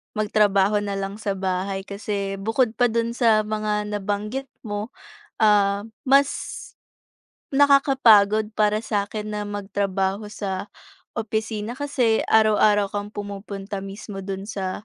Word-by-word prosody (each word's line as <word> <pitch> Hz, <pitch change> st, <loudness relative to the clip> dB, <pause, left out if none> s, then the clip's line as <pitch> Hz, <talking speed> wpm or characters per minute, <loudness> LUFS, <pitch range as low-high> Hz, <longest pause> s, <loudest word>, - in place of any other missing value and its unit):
magtrabaho 205 Hz, -1 st, +3 dB
na 200 Hz, -1 st, -3 dB
lang 195 Hz, +2 st, -4 dB
sa 200 Hz, -2 st, -2 dB
bahay, 190 Hz, +1 st, -2 dB
kasi 200 Hz, -1 st, -4 dB
bukod 225 Hz, +3 st, 0 dB
pa 245 Hz, -, +5 dB
do'n 230 Hz, 0 st, -1 dB
sa 225 Hz, -3 st, +3 dB
mga 210 Hz, -1 st, -2 dB
nabanggit 210 Hz, +6 st, -3 dB, 0.2 s
mo, 205 Hz, 0 st, -4 dB, 0.5 s
ah, 205 Hz, -1 st, +3 dB, 0.2 s
mas 275 Hz, 0 st, +5 dB, 1.2 s
nakakapagod 245 Hz, -7 st, +5 dB
para 210 Hz, 0 st, +2 dB
sa'kin 210 Hz, 0 st, -3 dB
na 210 Hz, -, -2 dB
magtrabaho 200 Hz, 0 st, -2 dB
sa 195 Hz, -1 st, -4 dB, 0.5 s
opisina. 220 Hz, 0 st, -3 dB
Kasi 255 Hz, -4 st, +1 dB
araw-araw 210 Hz, -2 st, +4 dB
kang 205 Hz, 0 st, -3 dB
pumupunta 200 Hz, 0 st, -6 dB
mismo 195 Hz, 0 st, -7 dB
do'n 195 Hz, 0 st, -5 dB
sa 195 Hz, -1 st, -4 dB
210 Hz, 115 wpm, -23 LUFS, 200-220 Hz, 1.2 s, pa